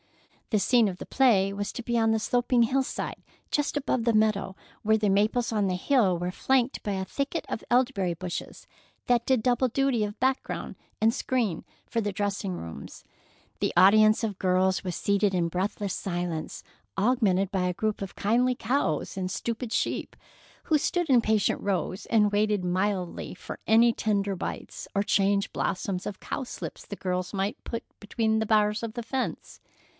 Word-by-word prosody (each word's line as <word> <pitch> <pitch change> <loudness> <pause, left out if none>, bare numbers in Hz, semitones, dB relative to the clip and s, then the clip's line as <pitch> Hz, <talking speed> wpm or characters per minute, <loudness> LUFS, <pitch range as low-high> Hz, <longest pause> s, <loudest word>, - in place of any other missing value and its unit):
The 215 - +2
scene 235 +1 +4
of 180 - -6
the - - -8
play 200 -7 +3
was 205 0 -3
to 240 - -6
be 235 0 0
on 225 -1 +3
the 220 - +2
sloping 245 +1 +2
hillside 265 +3 -2 0.3
just 295 0 0
above 260 -4 0
the 235 0 +2
meadow, 215 -3 +1 0.3
where 220 +1 +3
the 215 -1 0
maples 215 +5 +2
on 205 -2 +1
the 185 - 0
hill 195 -3 +2
were 175 +1 -2
flanked 260 +5 +1
by 205 - -2
a 190 0 -2
thicket 280 - -3
of - - -4
elderberry 240 -8 +2
bushes 175 +1 -6 0.4
that 240 -1 +2
did 260 -4 +2
double 250 +1 +2
duty 265 -2 +1
of 205 0 -5
background, 260 +1 -1 0.2
and 225 +1 +3
screen 230 -12 -1 0.2
for 230 - -1
the 205 -1 -1
dressing 200 -1 -2
rooms. 80 - -8 0.5
The - - 0
audience 215 +4 +6
of 205 -3 -5
girls 185 0 +2
was 180 -2 -3
seated 200 -1 +1
in 170 -2 +1
breathless 195 +2 -2
silence, 175 -3 -4 0.3
augmented 195 -4 +2
by 185 -2 0
a 180 - -1
group 215 +3 -2
of 195 - -6
kindly 245 +5 +2
cows 225 - -1
and 185 -1 -3
stupid 230 +4 -3
sheep, - - -2 0.5
who 310 -2 +2
stood 350 +2 0
in 250 -3 +6
patient 215 -2 +1
rows 190 -1 -2
and 210 -3 +3
waited 205 -2 +1
mildly 185 -1 -1
for - - -8
any 230 +1 +5
tender 200 -3 0
bites - - -6
or 200 - +2
chance 200 0 +2
blossoms 185 0 -2
of 205 - -6
cowslips 260 -3 -6
the 205 - -6
girls 180 0 -2
might 195 +2 -2
put 230 - -5 0.2
between 220 +1 0
the 220 - -1
bars 210 0 +3
of 225 -1 -4
the 240 - -4
fence. 260 +2 -4
210 Hz, 175 wpm, -27 LUFS, 190-235 Hz, 0.5 s, audience